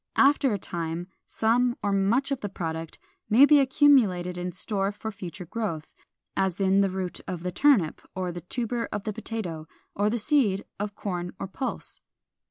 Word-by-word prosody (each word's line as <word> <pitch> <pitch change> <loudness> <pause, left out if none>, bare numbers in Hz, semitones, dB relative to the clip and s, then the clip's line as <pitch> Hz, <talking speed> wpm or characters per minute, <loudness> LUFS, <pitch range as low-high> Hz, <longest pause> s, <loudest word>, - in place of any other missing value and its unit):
After 275 -1 +5
a 205 - 0
time 170 -1 -4 0.2
some 240 +2 +2
or 205 - +1
much 210 +8 +2
of 275 - 0
the 205 - -3
product 165 -3 -5 0.3
may 240 +6 +8
be 295 0 +6
accumulated 255 -11 +4
in 180 0 -3
store 195 +2 0
for 220 +2 -6
future 185 -3 -8
growth, 170 -5 -4 0.4
as 190 -1 0
in 195 0 +4
the 195 - +2
root 185 -1 -4
of 180 -2 -5
the 180 - -2
turnip, 200 - +3
or 185 -1 -2
the 175 0 -7
tuber 235 +5 -3
of 205 - -3
the 215 - -3
potato, 195 -8 -5 0.3
or 205 +1 +1
the 235 - 0
seed 215 -5 +1
of 205 0 -3
corn 180 -4 -4
or - - -3
pulse. 255 +7 -5
200 Hz, 180 wpm, -27 LUFS, 180-230 Hz, 0.4 s, may